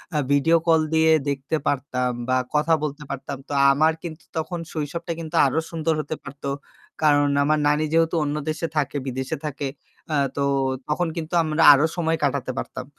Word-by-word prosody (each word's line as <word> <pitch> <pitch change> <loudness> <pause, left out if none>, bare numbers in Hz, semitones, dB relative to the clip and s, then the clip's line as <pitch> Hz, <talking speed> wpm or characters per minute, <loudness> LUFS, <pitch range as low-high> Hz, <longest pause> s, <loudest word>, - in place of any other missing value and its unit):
আ - - +2
video 160 +4 +4
call 160 -1 +5
দিয়ে 160 0 +4 0.2
দেখতে 140 +3 -2
পারতাম 125 -2 0 0.2
বা 130 - +3 0.2
কথা 150 +2 +3
বলতে 150 0 -4
পারতাম। 140 0 -5
তো - - -11
আ - - +5
আমার 155 +3 +3
কিন্তু 160 -1 -7
তখন 170 +2 -3
শৈশবটা 165 +2 -4
কিন্তু 160 -2 -6
আরও 145 +4 +1
সুন্দর 165 0 0
হতে 155 +1 -5
পারত। 140 +1 -11 0.6
কারণ 145 -1 +4 0.2
আমার 155 +1 +2
নানী 150 +1 +2
যেহেতু 165 +1 +3
অন্য 145 0 -2
দেশে 165 +1 -2
থাকে, 145 0 0
বিদেশে 130 +1 -3
থাকে, 140 -1 -3 0.5
আ - - +2 0.2
তো 140 - +1 0.5
তখন 170 +3 0
কিন্তু 160 +1 -5
আমরা 155 +1 0
আরও 140 +3 +3
সময় 165 -1 +1
কাটাতে 140 -2 0
পারতাম। 130 - -6
150 Hz, 180 wpm, -23 LUFS, 140-160 Hz, 0.6 s, call